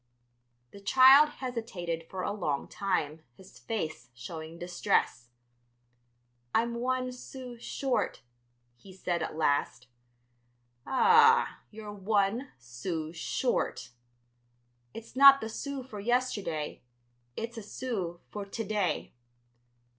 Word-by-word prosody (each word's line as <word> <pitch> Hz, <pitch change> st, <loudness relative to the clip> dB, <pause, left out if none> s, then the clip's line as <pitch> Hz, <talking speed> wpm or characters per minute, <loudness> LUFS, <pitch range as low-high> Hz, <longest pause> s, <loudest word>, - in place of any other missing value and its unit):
The 200 Hz, -, -12 dB
child 265 Hz, +8 st, +7 dB
hesitated 195 Hz, -, -5 dB
for 185 Hz, -1 st, -4 dB
a -, -, -1 dB
long 160 Hz, -9 st, -2 dB
time, 165 Hz, -6 st, -2 dB, 0.2 s
his 190 Hz, -, -16 dB
face 160 Hz, -, -4 dB
showing 160 Hz, +7 st, -8 dB
distress, 175 Hz, -8 st, 0 dB, 1.3 s
"I'm 235 Hz, +1 st, +2 dB
one 255 Hz, +1 st, -1 dB
sou 250 Hz, 0 st, -9 dB
short," 265 Hz, +2 st, -2 dB, 0.5 s
he 190 Hz, +8 st, -14 dB
said 180 Hz, -2 st, -2 dB
at -, -, -4 dB
last. 145 Hz, -5 st, 0 dB, 1.0 s
"Ah, 460 Hz, -, +5 dB
you're 210 Hz, -1 st, -9 dB
one 205 Hz, +5 st, 0 dB
sou 155 Hz, +7 st, -5 dB
short." 165 Hz, -, -1 dB, 1.0 s
"It's 225 Hz, -, -11 dB
not 275 Hz, +1 st, +9 dB
the 220 Hz, -, -5 dB
sou 275 Hz, +3 st, -5 dB
for 220 Hz, -5 st, -9 dB
yesterday; 205 Hz, -9 st, -1 dB, 0.6 s
it's 230 Hz, +1 st, -4 dB
a 225 Hz, -, -6 dB
sou 200 Hz, -6 st, -4 dB
for 205 Hz, -, -5 dB
to 200 Hz, +3 st, -5 dB
day." 205 Hz, -4 st, -1 dB
205 Hz, 110 wpm, -30 LUFS, 170-250 Hz, 1.3 s, not